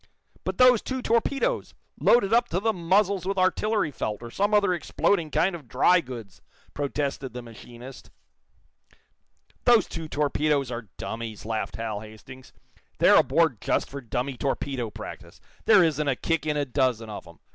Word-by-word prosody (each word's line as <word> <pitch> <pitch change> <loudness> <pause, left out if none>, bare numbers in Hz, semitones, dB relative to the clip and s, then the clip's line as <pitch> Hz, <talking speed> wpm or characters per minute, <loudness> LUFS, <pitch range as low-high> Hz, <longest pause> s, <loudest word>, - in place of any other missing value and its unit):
"But - - -3
those 250 -3 +6
two 260 -1 -4
torpedoes, 275 - 0 0.2
loaded 225 -3 +4
up 240 +1 +3
to 180 - 0
the 225 +2 +1
muzzles 190 +1 +1
with 195 0 -1
artillery 185 -1 +1
felt, 110 -4 -4
or 120 - -8
some 205 - 0
other 205 -3 +3
exploding 170 +1 0
kind 175 +4 +1
of 150 -7 -11
dry 175 +9 +4
goods!" 115 - -10 0.3
protested 140 -2 -3
the 125 0 -7
machinist. 120 +3 -12 1.6
"Those 240 -2 +6
two 165 -1 -6
torpedoes 145 -2 0
are 120 -3 -6
dummies," 115 -2 -6
laughed 110 -2 -3
Hal 110 -2 -4
Hastings. 110 +5 -13 0.5
"They're - - +6
aboard - - +2
just - - -1
for 140 0 -6
dummy 125 +2 -3
torpedo 135 -3 -2
practice. 105 - -10 0.3
There 210 -4 +7
isn't 150 -2 0
a 135 - +2
kick 160 +2 -1
in 150 -1 0
a 145 - 0
dozen 125 -4 0
of 105 - -8
'em. - - -15
145 Hz, 160 wpm, -26 LUFS, 120-195 Hz, 1.6 s, There